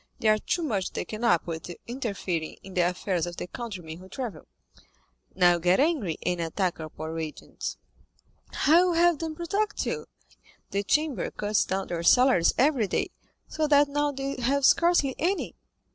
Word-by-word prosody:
They 220 - +2
are 215 0 +4
too 345 - -1
much 200 - -1
taken 215 +2 -5
up 175 -8 +3
with 165 0 -5 0.2
interfering 200 -10 -3
in 190 - -10
the 180 - +2
affairs 180 -1 -2
of 175 - -7
their - - -4
countrymen 180 -7 -7
who 185 +1 -13
travel." 240 +1 -6 0.9
"Now 175 -1 +5
you 175 - -1
get 180 +2 +3
angry, 270 - +1
and 175 -1 0
attack 175 +2 -1
our 155 -1 -6
poor 160 +1 -6
agents. 155 -2 -6 0.7
How 340 +4 +4
will 350 - +1
you 335 - +3
have 345 -4 +4
them 320 -1 -4
protect 400 +6 -1
you? 460 -1 -3 0.6
The 200 - 0
Chamber 300 +6 0
cuts 210 0 0
down 190 0 -2
their 170 -1 -2
salaries 245 -1 +5
every 260 -5 +3
day, - - -1 0.4
so 310 -1 -1
that 290 -1 +5
now 290 +1 0
they 275 0 -4
have 275 +3 +2
scarcely 335 -6 +4
any. 375 +5 -1
220 Hz, 175 wpm, -27 LUFS, 180-295 Hz, 0.9 s, Now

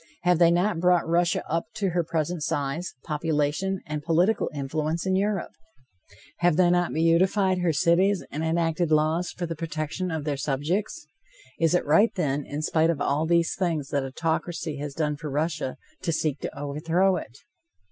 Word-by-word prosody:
Have 180 -2 +3
they 170 -1 +6
not 175 +2 +1
brought 180 -1 +3
Russia 170 +1 +1
up 165 +1 -1
to 195 -3 -1
her 175 0 +1
present 165 +1 -2
size, 150 +2 -2
population 155 +4 -1
and 150 -1 -4
political 175 +7 +2
influence 155 +4 -2
in 190 0 +1
Europe? 200 -1 0 0.9
Have 175 -2 +2
they 180 -1 +5
not 175 0 +2
beautified 185 +4 +2
her 175 -2 +2
cities 175 +6 +2
and 155 +3 -3
enacted 165 +1 0
laws 155 +3 +2
for 175 - -4
the 165 0 -4
protection 160 +2 -3
of 160 -3 -3
their 145 -2 -2
subjects? 165 - -2 0.5
Is 165 +1 +3
it - - +1
right, 165 +10 +5
then, 145 -5 -1
in 150 +2 -4
spite 160 +1 +2
of 165 -4 0
all 145 +3 0
these 170 0 +2
things 165 -7 -1
that 140 -1 0
autocracy 160 +2 -2
has 145 -1 -6
done 150 -2 -1
for 155 0 -6
Russia, 150 -1 -2 0.2
to 175 - -1
seek 155 -2 -1
to - - -6
overthrow 165 +6 +1
it? 120 -5 -8
165 Hz, 175 wpm, -26 LUFS, 150-175 Hz, 0.9 s, they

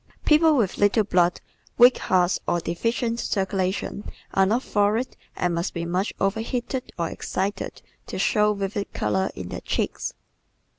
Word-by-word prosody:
People 310 0 +5
with 210 -7 0
little 205 +2 +4
blood, 180 -3 +2 0.4
weak 245 +1 +7
hearts 180 0 +2
or 175 - +2
deficient 230 +7 -1
circulation 195 0 -1 0.3
are 195 0 +4
not 235 +6 +1
florid 210 +4 +1 0.2
and 180 -1 0
must 170 +3 -2
be 170 0 -2
much 180 +4 -1
overheated 235 +5 -2
or 170 -1 0
excited 195 +4 -3 0.2
to - - -5
show 210 -2 +3
vivid 200 +1 -3
color 190 0 0
in 90 -1 -6
their - - -5
cheeks. - - -2
200 Hz, 145 wpm, -24 LUFS, 185-230 Hz, 0.4 s, weak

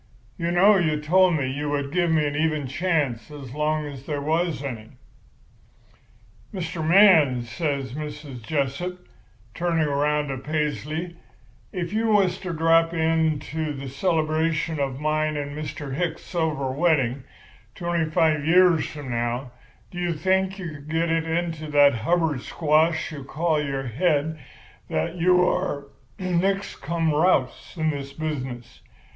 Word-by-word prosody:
You 170 -2 -2
know 195 +4 +5
you 155 -4 +1
told 180 +3 +4
me 140 -4 0
you 145 +3 -3
would 140 -1 -2
give 175 0 +1
me 155 -2 +2
an 145 0 -2
even 155 -1 0
chance 135 -6 -1
as 140 -4 -9
long 150 +1 0
as 140 -2 -9
there 145 -2 -2
was 160 0 -1
any.' 115 -6 -6 1.6
"'Mr. 170 -4 -4
Man,' 160 - +6
says 135 +1 -3
Mrs. 150 -3 -7
Jessup, 155 +8 -3 0.5
turning 165 0 0
around 145 +1 0
to 135 -2 -3
Paisley, 155 +3 -3 0.5
'if 175 0 -4
you 225 +1 +1
was 195 -4 +3
to 185 - -5
drop 165 +1 +3
in 160 -1 +2
to 155 -1 -2
the 135 -1 -7
celebration 160 +1 0
of 135 -2 -2
mine 155 0 0
and 145 0 -4
Mr. 150 -2 -5
Hicks's 165 +2 -2
silver 155 -6 -1
wedding, 135 -4 +1 0.5
twenty 170 -3 -1
five 155 -1 +2
years 175 0 +4
from 145 -4 -7
now, 120 +2 -2 0.4
do 175 - -6
you 175 -1 0
think 190 +4 0
you 185 -3 -5
could 145 -1 -11
get 165 +1 0
it 165 0 +1
into 165 -2 -2
that 145 -1 +6
Hubbard 150 +4 0
squash 160 +3 +1
you 145 -3 -7
call 155 +2 0
your 135 -2 -3
head 155 +4 0 0.5
that 80 - -2
you 180 +1 +4
are 145 -6 -1 0.3
nix 190 +2 0
cum 165 +2 -1
rous 150 -4 +1
in 160 -1 +1
this 140 -1 -6
business? 130 -6 -5
155 Hz, 150 wpm, -24 LUFS, 140-170 Hz, 1.6 s, Man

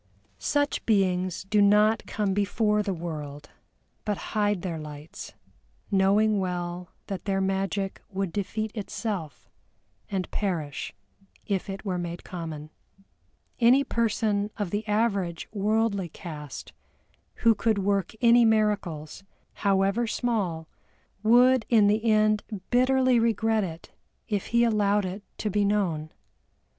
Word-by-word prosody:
Such 290 0 0
beings 185 -4 +1
do 205 +2 +2
not 210 +2 +4
come 205 -3 -1
before 210 +1 +1
the 205 -1 -2
world, 150 -4 -6 0.5
but 210 -2 -1 0.2
hide 205 -4 +1
their 170 -4 -3
lights, 150 0 -9 0.6
knowing 200 +2 +3
well 180 -1 -3 0.2
that 195 -2 -6
their 195 -1 0
magic 195 0 -1
would 195 -4 -3
defeat 215 +2 -2
itself, 200 - -5 0.6
and 190 -2 -3
perish 165 -8 -3 0.5
if 200 -1 -2
it 195 +2 -6
were 185 -3 -1
made 175 0 -5
common. 160 -4 -7 0.9
Any 250 +3 +5
person 215 -4 0
of 205 -5 -3
the 210 +1 -2
average 200 -6 0
worldly 210 -2 0
cast 150 -3 -8 0.6
who 230 -1 +4
could 225 -1 +1
work 200 -2 0
any 235 0 +6
miracles, 205 -8 0 0.3
however 200 +3 +1
small, 200 -10 -1 0.5
would 245 +3 +5
in 220 -4 +5
the 210 +2 +2
end 215 -1 +3 0.3
bitterly 255 0 +4
regret 225 -1 +2
it 165 -2 -7 0.4
if 205 -3 -2
he 235 0 +3
allowed 210 -3 +2
it 185 +3 -5 0.2
to 210 - -2
be 205 +1 +2
known. 180 -7 0
200 Hz, 125 wpm, -27 LUFS, 180-220 Hz, 0.9 s, any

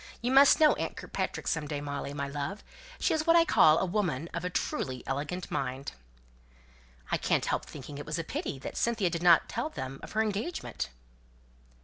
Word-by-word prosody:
You 245 +1 -1
must 275 +4 +7
know 310 -1 +7
aunt - - -4
Kirkpatrick - - -4
some 150 -3 -1
day, 145 -1 -3
Molly, 140 -1 -4
my 140 -1 -3
love; 145 +8 -4 0.4
she - - +2
is 315 0 -1
what 330 - +6
I 335 -1 +6
call 155 - +6
a - - +1
woman 175 -6 -1
of 170 - -3
a 180 - -1
truly 130 -7 -2
elegant 150 +7 -3
mind." 130 +2 -3 1.2
"I - - +3
can't - - +1
help - - -1
thinking 145 +1 -8
it 145 - -6
was 150 - -2
a 165 - -2
pity 150 - -4
that 135 - -7
Cynthia 225 -7 +1
did 170 0 -3
not 175 -2 +6
tell 235 +8 -2
them 135 - -6
of - - -9
her 220 +1 +2
engagement." 215 - -3
170 Hz, 200 wpm, -30 LUFS, 145-215 Hz, 1.2 s, must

